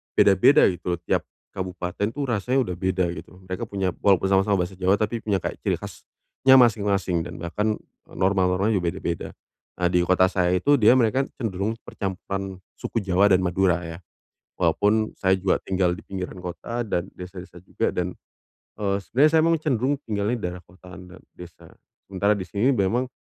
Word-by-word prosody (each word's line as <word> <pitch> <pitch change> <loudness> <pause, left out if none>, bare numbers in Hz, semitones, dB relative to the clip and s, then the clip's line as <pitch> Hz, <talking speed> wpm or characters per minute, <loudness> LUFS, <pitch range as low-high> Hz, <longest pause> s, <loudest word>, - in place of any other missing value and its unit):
beda-beda 100 +10 +5
gitu 90 -1 -3
loh 85 - -16
tiap 85 - -1 0.3
kabupaten, 90 -1 -5
dan 100 - +2
itu 145 +6 -6
rasanya 125 +1 0
udah 90 - -4
beda 95 0 0
gitu. 90 - -11
Mereka 95 0 -4
punya 95 -3 -1
walaupun 95 -2 +4
sama-sama 95 -1 +2
bahasa 95 - -11
Jawa 95 +1 +3
tapi 110 +2 -1
punya 100 -3 0
kayak - - -4
ciri - - 0
khasnya 130 0 0
masing-masing 100 -7 +2
dan 85 0 -8
bahkan 105 +5 -1 0.3
norma-normanya 95 +2 +1
juga 90 -3 -1
beda-beda. 85 -1 -4 0.5
Nah 90 - +2
di 90 0 +2
kota 95 0 +4
saya 90 -2 +1
itu, 145 +11 +3
dia 110 +4 +7
mereka 130 +3 +2 0.2
cenderung 105 -2 -2
percampuran 95 0 -5 0.2
suku 115 - -3
Jawa 95 +2 +3
dan 95 - +5
Madura 90 -1 +1
ya. 85 0 -7 0.6
Walaupun 105 +6 +1
saya 95 -1 +1
juga 95 0 +1
tinggal 90 -2 0
di - - -13
pinggiran 95 -1 -6
kota 115 +7 -4
dan 95 -4 -2
desa-desa 90 -1 -10
juga - - -1
dan, 90 0 -3 0.6
eee, 100 -1 0
sebenarnya 140 - +3
saya - - +5
memang 165 -1 +2
cenderung 140 -2 0
tinggalnya 105 +2 -1
di 120 - -7
daerah 90 0 -10
kota 90 0 -14
dan 90 0 -13 0.2
desa. 90 -1 -13 0.4
Sementara 100 +2 +2
di 95 - -4
sini 105 +8 +1
memang 115 +5 +1
95 Hz, 175 wpm, -24 LUFS, 90-105 Hz, 0.6 s, dia